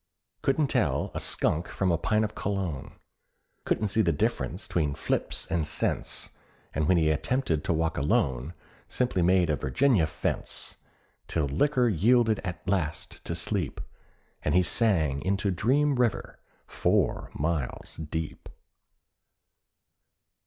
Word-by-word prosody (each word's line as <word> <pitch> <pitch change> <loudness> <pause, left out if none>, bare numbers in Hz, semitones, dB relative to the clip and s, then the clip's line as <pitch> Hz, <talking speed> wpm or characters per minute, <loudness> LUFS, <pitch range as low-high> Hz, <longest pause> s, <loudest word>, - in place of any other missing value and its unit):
Couldn't 140 +2 +2
tell - - +1
a - - -3
skunk 80 +3 0
from 95 -2 0
a 85 - +2
pint 110 +4 +2
of 105 - -5
Cologne, 95 -8 -3 0.7
Couldn't 105 - 0
see 110 - +2
the 85 -5 +3
difference 75 - -1
'tween 75 -5 0
fips - - -1
and 80 -3 0
cents; 75 - -1 0.4
And 75 0 0
when 90 - +4
he 80 -2 +3
attempted 80 - 0
to - - +1
walk 80 -1 0
alone, 70 +2 0 0.3
Simply 125 -8 0
made 90 -1 +4
a - - +2
Virginia 100 - +2
fence; - - -3 0.5
Till 80 -3 0
liquor 125 - +2
yielded 110 +3 +3
at 85 -1 -6
last 90 -6 -2
to 85 - -2
sleep, 85 -2 -2 0.6
And - - 0
he 90 - +5
sank 80 - +1
into 100 +1 +1
Dream 135 +10 +2
River—four 125 -5 -1
miles 75 -3 -2
deep. 80 0 -5
90 Hz, 130 wpm, -28 LUFS, 80-110 Hz, 0.7 s, he